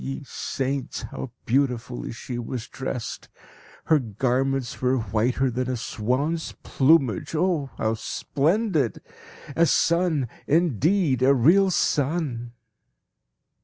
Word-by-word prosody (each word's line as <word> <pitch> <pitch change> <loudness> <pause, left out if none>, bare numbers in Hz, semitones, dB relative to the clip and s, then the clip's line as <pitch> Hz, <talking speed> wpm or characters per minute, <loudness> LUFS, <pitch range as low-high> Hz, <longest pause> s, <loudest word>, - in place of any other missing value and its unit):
Ye 65 0 -5
saints! 135 0 -3
how 130 - -6 0.2
beautifully 125 -1 0
she 120 +1 -6
was 120 0 -5
dressed. 130 -3 -5 0.6
Her 155 -2 +4
garments 130 +3 -1
were 130 +1 +2
whiter 120 +4 0
than 125 +2 -2
a 130 - -1
swan's 130 +9 -2
plumage 135 - +2
oh 160 -4 +1
how 110 0 0
splendid! 155 - 0 0.5
A 170 0 +4
sun, 170 -7 +2 0.2
indeed, 160 - +2
a 135 +2 +5
real 175 +10 +5
sun! 145 -8 0
135 Hz, 105 wpm, -25 LUFS, 120-160 Hz, 0.6 s, a